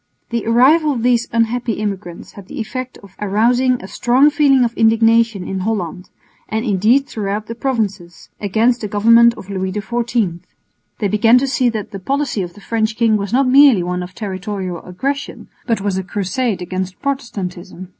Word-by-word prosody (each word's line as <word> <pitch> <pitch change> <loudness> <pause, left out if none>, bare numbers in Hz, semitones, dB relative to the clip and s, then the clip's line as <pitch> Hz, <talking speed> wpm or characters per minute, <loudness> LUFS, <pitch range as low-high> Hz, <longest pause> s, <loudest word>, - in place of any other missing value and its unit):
The 235 -1 -2
arrival 285 +7 +4
of 235 -3 -4
these 240 -1 +2
unhappy 230 +1 0
immigrants 195 -5 -5
had 200 -2 -13
the - - -8
effect 255 +3 -5
of 195 -1 -16
arousing 235 +5 +2
a - - -7
strong 260 +7 +3
feeling 280 -3 +4
of 230 - -3
indignation 225 -3 +2
in 190 - -3
Holland, 185 -3 -3 0.4
and 220 +2 -2
indeed 225 +6 +2
throughout 210 -3 -4
the 230 - -6
provinces, 210 -8 -3
against 225 +4 +1
the 210 - -3
government 230 +3 +5
of 195 - -10
Louis 190 -1 -2
XIV. 220 -3 -2 0.6
They 205 - -1
began 220 +4 +4
to 270 +2 +1
see 255 -2 +1
that 215 -3 -5
the 195 - -6
policy 270 +1 -1
of 175 -1 -6
the 205 - -14
French 220 0 -1
king 230 -2 +3
was 200 -1 -3
not 260 +2 +2
merely 260 -7 +6
one 180 +1 -3
of 180 +1 -8
territorial 190 -3 -5
aggression, 275 +10 -5 0.2
but 230 -4 0
was 195 -2 -1
a - - -4
crusade 200 +2 -2
against 185 +1 -5
Protestantism. 185 -9 -5
220 Hz, 175 wpm, -18 LUFS, 195-245 Hz, 0.6 s, merely